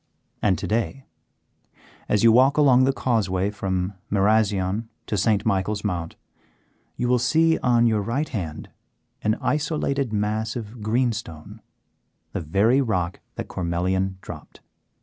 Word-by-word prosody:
And 95 Hz, -4 st, +2 dB
to -, -, -5 dB
day, 120 Hz, +5 st, -2 dB, 1.0 s
as 105 Hz, 0 st, +2 dB
you 115 Hz, -, +7 dB
walk 130 Hz, +5 st, +5 dB
along 130 Hz, -4 st, +5 dB
the 135 Hz, -, +3 dB
causeway 105 Hz, -7 st, 0 dB
from 95 Hz, -2 st, -2 dB, 0.2 s
Marazion 105 Hz, 0 st, +1 dB, 0.2 s
to -, -, -2 dB
St. 105 Hz, +1 st, +1 dB
Michael's 105 Hz, 0 st, 0 dB
Mount, 85 Hz, -5 st, -3 dB, 0.8 s
you 125 Hz, -, -1 dB
will 125 Hz, 0 st, +3 dB
see 160 Hz, +7 st, +3 dB
on 120 Hz, -2 st, +3 dB
your 110 Hz, -3 st, +2 dB
right 130 Hz, +9 st, -1 dB
hand 85 Hz, -, -5 dB, 0.5 s
an 110 Hz, +1 st, +1 dB
isolated 145 Hz, -4 st, -1 dB
mass 110 Hz, +1 st, -1 dB
of 115 Hz, -1 st, -7 dB
greenstone, 110 Hz, -8 st, -2 dB, 0.7 s
the -, -, -3 dB
very 100 Hz, -, +3 dB
rock 95 Hz, -8 st, -1 dB, 0.2 s
that -, -, -5 dB
Cormelian 95 Hz, +2 st, -1 dB
dropped. -, -, -11 dB
110 Hz, 130 wpm, -24 LUFS, 95-125 Hz, 1.0 s, you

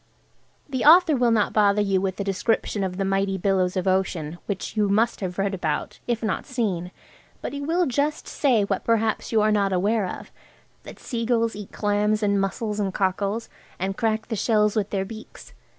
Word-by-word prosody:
The 265 Hz, -3 st, -2 dB
author 330 Hz, 0 st, +7 dB
will 245 Hz, -2 st, +2 dB
not 220 Hz, -3 st, +2 dB
bother 205 Hz, -1 st, +3 dB
you 195 Hz, -2 st, +1 dB
with 190 Hz, 0 st, -2 dB
a -, -, 0 dB
description 200 Hz, +1 st, -1 dB
of 185 Hz, -1 st, -3 dB
the 195 Hz, -, -1 dB
mighty 195 Hz, 0 st, 0 dB
billows 190 Hz, -1 st, +1 dB
of 185 Hz, -, -1 dB
ocean, 175 Hz, -4 st, -1 dB
which 200 Hz, +1 st, -4 dB
you 210 Hz, -2 st, +2 dB
must 220 Hz, +4 st, +2 dB
have 180 Hz, -2 st, -4 dB
read 195 Hz, 0 st, 0 dB
about, 160 Hz, -5 st, -3 dB
if 235 Hz, -1 st, -1 dB
not 215 Hz, -, -2 dB
seen, 205 Hz, -9 st, -2 dB, 0.5 s
but -, -, -5 dB
he 285 Hz, -, -4 dB
will 335 Hz, +5 st, +1 dB
just 290 Hz, +3 st, -1 dB
say 250 Hz, -8 st, +2 dB
what 200 Hz, -1 st, -2 dB
perhaps 225 Hz, -2 st, 0 dB
you 220 Hz, -2 st, +3 dB
are 215 Hz, -, +3 dB
not 200 Hz, -2 st, +2 dB
aware 200 Hz, +2 st, +1 dB
of–that -, -, -12 dB
seagulls 230 Hz, -2 st, -1 dB
eat 205 Hz, -1 st, -8 dB
clams 210 Hz, +1 st, 0 dB
and 200 Hz, -1 st, +2 dB
mussels 210 Hz, +2 st, -2 dB
and 195 Hz, -2 st, -2 dB
cockles, 200 Hz, +3 st, -1 dB, 0.3 s
and 190 Hz, +1 st, -2 dB
crack 220 Hz, -1 st, -1 dB
the 225 Hz, -, -1 dB
shells 210 Hz, 0 st, +2 dB
with 210 Hz, -2 st, 0 dB
their 195 Hz, -1 st, -1 dB
beaks. 220 Hz, +2 st, -11 dB
205 Hz, 190 wpm, -24 LUFS, 195-230 Hz, 0.5 s, author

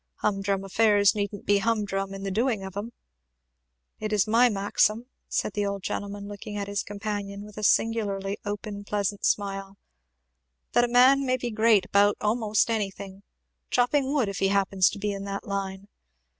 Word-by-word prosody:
Hum 195 Hz, -2 st, -1 dB
drum 195 Hz, 0 st, -1 dB
affairs 205 Hz, 0 st, +4 dB
needn't 205 Hz, -1 st, -4 dB
be 205 Hz, 0 st, +3 dB
hum 220 Hz, 0 st, 0 dB
drum 195 Hz, 0 st, -3 dB
in 195 Hz, 0 st, -7 dB
the 195 Hz, -, -3 dB
doing 225 Hz, 0 st, 0 dB
of 190 Hz, -1 st, -8 dB
'em. 210 Hz, +4 st, -5 dB, 1.1 s
It 215 Hz, 0 st, -3 dB
is 210 Hz, -3 st, +3 dB
my 235 Hz, +3 st, +5 dB
maxim," 210 Hz, +2 st, +1 dB, 0.2 s
said 210 Hz, -, -1 dB
the 205 Hz, -, -1 dB
old 200 Hz, -1 st, -3 dB
gentleman 200 Hz, 0 st, -4 dB
looking 205 Hz, 0 st, -7 dB
at 200 Hz, -1 st, -3 dB
his 200 Hz, 0 st, -1 dB
companion 205 Hz, -1 st, -5 dB
with 210 Hz, -1 st, -12 dB
a 215 Hz, -, -6 dB
singularly 205 Hz, -3 st, +1 dB
open 205 Hz, 0 st, -5 dB
pleasant 205 Hz, -1 st, -2 dB
smile, 195 Hz, -1 st, -1 dB, 0.9 s
"that 240 Hz, -, +4 dB
a -, -, -2 dB
man 255 Hz, +3 st, +5 dB
may 255 Hz, -1 st, +1 dB
be 245 Hz, -1 st, -4 dB
great 215 Hz, -3 st, +4 dB
about 200 Hz, +2 st, +3 dB
a'most 215 Hz, 0 st, +1 dB
anything 195 Hz, -2 st, -4 dB, 0.5 s
chopping 265 Hz, +2 st, +2 dB
wood, 280 Hz, -7 st, +1 dB
if 200 Hz, -2 st, -4 dB
he 195 Hz, -, +2 dB
happens 195 Hz, -1 st, +3 dB
to -, -, -7 dB
be 205 Hz, +1 st, -2 dB
in 195 Hz, 0 st, -5 dB
that 200 Hz, 0 st, -5 dB
line. 195 Hz, 0 st, -4 dB
205 Hz, 180 wpm, -26 LUFS, 195-215 Hz, 1.1 s, my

